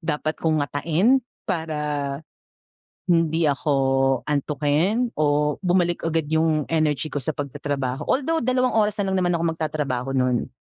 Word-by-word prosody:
dapat 155 -2 -1
kong 155 -3 +1
ngatain, 165 - +2 0.2
para 150 -5 -2 0.9
hindi 165 -1 +2
ako 135 -2 +1
antukin 150 - 0
o 150 0 +2
bumalik 175 -2 +1
agad 165 0 0
yung 160 -1 +2
energy 155 -2 0
ko 145 - -2
sa 145 +3 -3
pagta-trabaho. 140 -2 -3
Although 320 +5 +1
2 255 +1 +1
oras 210 -1 +2
na 190 - -1
lang 190 - +1
naman 175 -1 +1
ako 165 - -1
magta-trabaho 145 -5 -2
nun. 125 -2 0
155 Hz, 135 wpm, -23 LUFS, 145-170 Hz, 0.9 s, ngatain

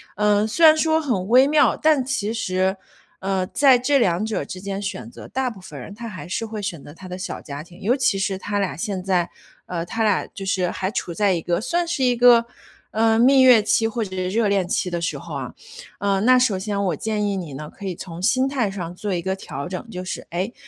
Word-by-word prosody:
呃， 210 0 +2
虽 325 +10 +3
然 315 0 +8
说 320 0 +2
很 225 -11 -1
微 255 +4 +6
妙， 300 0 +4
但 305 -5 +3
其 230 -5 -1
实， 190 -3 0 0.4
呃， 190 -1 -1
在 270 +2 +5
这 275 +2 +2
两 185 -2 +1
者 220 -1 -2
之 185 - -7
间 200 0 -4
选 205 +3 -5
择， - - -11
大 265 -1 -1
部 210 - -12
分 - - -10
人 205 - -9
他 235 +2 -7
还 185 -4 -8
是 185 +5 -3
会 220 -1 -6
选 175 -7 -5
择 - - -11
他 185 +2 -12
的 180 0 -6
小 185 - -5
家 145 0 -7
庭， 175 +3 -16
尤 230 +6 +2
其 255 -7 +1
是 195 0 -1
他 205 +1 -2
俩 195 -3 -1
现 190 0 -3
在 180 -2 +1 0.4
呃， 170 -2 -3
他 225 +6 -2
俩 210 -3 +2
就 195 - -8
是 185 -2 0
还 190 +1 -3
处 180 - -3
在 200 +1 +2
一 170 - -1
个 170 +1 0
算 340 - 0
是 300 -6 -1
一 250 -1 +3
个， 240 -1 +6 0.5
呃， 225 0 +3
蜜 265 +3 +6
月 250 -4 +7
期 225 +1 +2
或 225 0 -2
者 190 - -8
热 215 +3 +1
恋 195 -3 +1
期 180 - -1
的 170 -1 -2
时 165 - -2
候 - - -9
啊。 - - -5 0.5
嗯， 200 0 +1
那 255 +1 +6
首 225 -7 +2
先 200 0 -2
我 175 - 0
建 210 +5 -2
议 200 - -1
你 165 -6 -6
呢， 150 +3 -8
可 200 - -9
以 180 - -3
从 170 0 -8
心 255 +6 +2
态 260 -6 0
上 180 -3 -6
做 205 +2 -4
一 175 - -2
个 190 0 -1
调 140 -6 -6
整， 185 +5 -6
就 180 -4 -6
是， - - -6
诶， 185 +7 -3
205 Hz, 265 characters per minute, -22 LUFS, 185-235 Hz, 0.5 s, 然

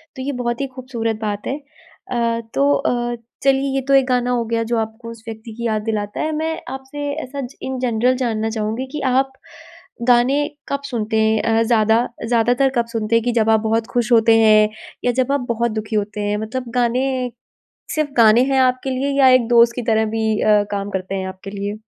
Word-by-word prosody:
तो 260 - -6
ये 280 +2 -2
बहुत 240 +1 -2
ही 275 - -1
खूबसूरत 235 -4 -3
बात 210 -1 -3
है। 270 - -1
अ, 255 -6 -4
तो 280 +1 +3
अ, 240 -3 0 0.3
चलिए 270 0 +2
ये 270 - +1
तो 275 - +3
एक 270 -1 +5
गाना 250 -1 +1
हो 240 -1 +1
गया 230 0 -1
जो 235 - +2
आपको 220 +1 -4
उस 230 -1 -13
व्यक्ति 225 0 -8
की 235 +1 -5
याद 215 -1 0
दिलाता 210 -2 -3
है। 315 - -1
मैं 320 +1 -2
आपसे 270 +2 -6
ऐसा 280 +2 -6
ज 255 0 -8
इन 265 -1 -4
जनरल 250 0 +1
जानना 225 -3 -1
चाहूँगी 220 +3 -2
कि 300 0 -4
आप 265 +1 +2 0.8
गाने 255 +4 +4 0.2
कब 280 0 -2
सुनते 220 -2 -2
हैं? 220 0 +2
अ, 225 0 +2
ज़्यादा 225 0 +3 0.2
ज़्यादातर 245 +3 +3
कब 235 - +2
सुनते 225 0 0
हैं 230 - +3
कि 245 - +2
जब 220 0 +2
आप 220 0 +5
बहुत 225 +1 0
खुश 240 0 0
होते 225 -1 +5
हैं 215 -1 +5 0.4
या 245 - +3
जब 255 +2 0
आप 280 -3 -1
बहुत 235 0 0
दुखी 215 0 -4
होते 210 0 -2
हैं? 205 0 -1
मतलब 235 +3 -4
गाने, 250 +1 0 0.6
सिर्फ़ 305 -2 -1
गाने 230 +1 +6
हैं 265 - +3
आपके 255 +1 +1
लिए 265 +2 -1
या 270 - +7
एक 255 -2 +4
दोस्त 235 0 +5
की 245 - -2
तरह 220 0 +3
भी 220 -1 0
अ, 210 -1 +4
काम 200 0 -3
करते 190 -1 -4
हैं 190 -1 -3
आपके 190 +1 -8
लिए? 200 +1 -4
235 Hz, 215 wpm, -20 LUFS, 220-260 Hz, 0.8 s, या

